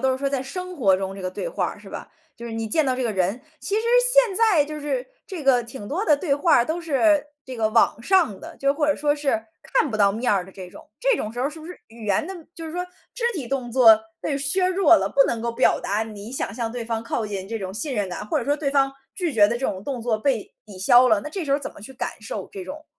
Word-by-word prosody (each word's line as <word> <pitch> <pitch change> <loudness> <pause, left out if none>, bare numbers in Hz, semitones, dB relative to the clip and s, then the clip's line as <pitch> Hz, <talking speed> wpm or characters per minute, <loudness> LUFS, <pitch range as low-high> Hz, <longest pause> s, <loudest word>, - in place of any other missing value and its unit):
都 265 0 +2
是 260 - -3
说 275 +1 0
在 275 -2 -1
生 365 +7 -6
活 195 - +4
中 195 0 -4
这 195 - -9
个 185 - -2
对 - - -4
话 - - -1
儿， - - -7
是 - - -13
吧？ - - -8 0.3
就 235 - -8
是 230 - -6
你 225 0 -3
见 300 +8 +1
到 255 -1 +1
这 260 - -2
个 225 - 0
人。 195 +5 0 0.2
其 405 - -3
实 440 - +1 0.3
现 - - +5
在 405 -9 +4
就 305 +1 -7
是 - - -2 0.2
这 370 -7 -6
个 250 -3 +4
挺 235 -3 -9
多 350 - -2
的 300 -9 +4
对 285 -2 0
话 305 +4 +4
儿 235 - +4
都 320 +6 -2
是 305 -1 +2 0.2
这 260 - -7
个 220 -1 +1
网 230 0 +2
上 335 - +2
的， - - -10
就 275 0 +2
或 295 0 0
者 295 - +2
说 290 0 +1
是， 275 -7 -1 0.2
看 315 -2 +1
不 215 - -2
到 200 -1 +4
面 230 +4 0
儿 195 -3 +1
的 190 - -13
这 185 -1 -10
种。 - - -14
这 - - +3
种 215 - -3
时 235 - -9
候 255 - +1
儿 - - -2
是 315 +1 -11
不 310 - -10
是 360 - -9
语 225 -1 -11
言 200 +8 +1
的 385 - -6 0.2
就 330 - -8
是 315 - -7
说 360 +1 -2 0.3
肢 485 - -7
体 275 -8 -4
动 255 -2 -3
作 225 -3 +7 0.2
被 280 -2 -1
削 285 +7 +1
弱 370 -3 +5
了， - - 0
不 275 - +5
能 230 -1 -2
够 235 0 -1
表 175 -6 +3
达 205 +2 -1
你 215 +1 -8
想 260 - -3
向 230 -1 -3
对 245 - -4
方 225 -1 -3
靠 230 -1 -2
近 195 -2 -5
这 225 +1 -4
种 190 -1 -5
信 275 +4 -3
任 205 -4 -1
感， 180 +3 -6
或 - - 0
者 - - -3
说 290 - +2
对 285 -2 -1
方 275 -1 +3 0.2
拒 345 - -2
绝 205 -2 +6
的 235 +3 -2
这 265 - -1
种 190 +1 -5
动 265 -4 -3
作 225 -2 0
被 245 -2 -1
抵 205 -4 -12
消 245 +6 +6
了， 215 -3 +4
那 - - -6
这 355 +3 -4
时 285 - -5
候 280 - +3
儿 - - -16
怎 - - -5
么 - - -14
去 265 - -10
感 260 - -3
受 - - -6
这 390 -2 -7
种 310 +1 -8
260 Hz, 320 characters per minute, -23 LUFS, 220-310 Hz, 0.3 s, 作